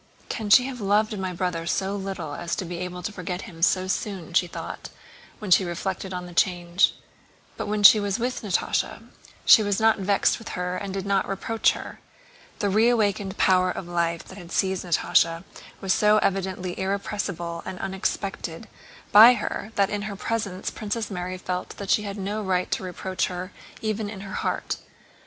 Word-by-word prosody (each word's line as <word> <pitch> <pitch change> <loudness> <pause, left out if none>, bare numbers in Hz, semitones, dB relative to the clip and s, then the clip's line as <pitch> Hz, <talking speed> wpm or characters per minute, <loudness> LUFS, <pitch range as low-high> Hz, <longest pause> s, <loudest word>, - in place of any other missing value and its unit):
"Can 215 -3 -3
she 250 +4 +7
have 255 -3 -6
loved 210 +2 +2
my 185 -1 -2
brother 175 -2 -2
so 195 +3 0
little 190 -6 -5
as 170 +3 -3
to 190 - -4
be 175 0 -5
able 180 0 -5
to 215 - -3
forget 180 -1 -5
him 170 -7 -11
so 185 +2 +3
soon?" 185 -3 -3
she 180 0 +3
thought - - -7 0.5
when 205 -3 -6
she 190 - +7
reflected 185 +2 -4
on 180 -1 -4
the 175 - -10
change. 175 +1 +2 0.6
But - - -4
when 210 0 -1
she 210 +2 +10
was 205 0 -1
with 245 +2 -2
Natásha 200 -5 -1 0.4
she 225 - +9
was 205 -2 0
not 220 -1 +4
vexed 200 +4 +2
with 225 - -9
her 180 0 -2
and 195 +1 -4
did 195 0 -4
not 200 -1 +1
reproach 220 +3 +1
her. - - -8 0.6
The 205 - 0
reawakened 210 -3 +2
power 185 -1 +4
of 180 - -5
life 170 -1 -1
that 190 - -12
had 175 -2 -11
seized 190 0 0
Natásha 165 -1 +2 0.4
was 190 -1 +2
so 210 0 +4
evidently 190 -3 -1
irrepressible 190 -3 -3
and 185 - -6
unexpected 190 0 -3 0.4
by 225 +4 +10
her 215 - -4
that 200 -1 +2
in 205 -1 -2
her 200 - -5
presence 200 -3 -3
Princess 215 0 -4
Mary 180 0 -4
felt 180 0 -4
that 200 -1 -3
she - - +4
had 200 -1 -5
no 205 +2 -3
right 185 -2 -1
to - - 0
reproach 185 0 -2
her 180 +1 -6 0.3
even 215 -1 -1
in 205 -2 -8
her 195 0 -8
heart. - - -2
190 Hz, 185 wpm, -25 LUFS, 180-205 Hz, 0.6 s, she